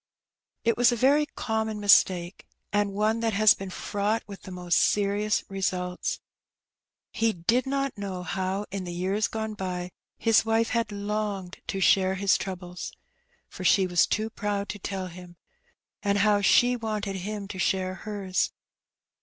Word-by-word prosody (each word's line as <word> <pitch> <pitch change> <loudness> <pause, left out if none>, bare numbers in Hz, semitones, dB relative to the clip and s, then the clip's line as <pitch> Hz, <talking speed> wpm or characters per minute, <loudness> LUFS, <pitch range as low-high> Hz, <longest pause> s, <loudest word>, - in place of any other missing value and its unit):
It 230 0 +2
was 245 0 +5
a - - +1
very 285 +5 +3
common 220 -4 -2
mistake, 185 -3 +3 0.3
and 205 -1 +2
one 215 +3 +1
that 225 -1 0
has 215 0 +6
been 195 -1 -7
fraught 205 +4 -1
with 200 -2 -10
the 190 - -10
most 180 -1 +1
serious 205 +1 +1
results. 180 -2 -2 0.9
He 225 -1 +1
did 230 +10 +1
not 275 -1 -1
know 190 -3 -4
how, 190 +3 -2
in 195 -1 -3
the 175 - -5
years 190 +4 0
gone 220 -1 -4
by, 180 -3 -4 0.3
his 225 -2 +4
wife 225 +1 +1
had 230 -2 0
longed 205 -2 -3
to 195 - -2
share 190 0 +4
his 200 +1 +3
troubles 180 -1 -5 0.5
(for 185 - -9
she 190 +1 +4
was 175 -1 +3
too 220 +1 -1
proud 205 -2 -2
to 205 - -5
tell 190 0 -4
him), 180 0 -11 0.7
and 200 -1 +1
how 205 0 +3
she 245 +5 +5
wanted 215 -4 -3
him 200 +2 -5
to 190 - -6
share 185 0 0
hers. 195 -1 -2
200 Hz, 160 wpm, -27 LUFS, 185-215 Hz, 0.9 s, has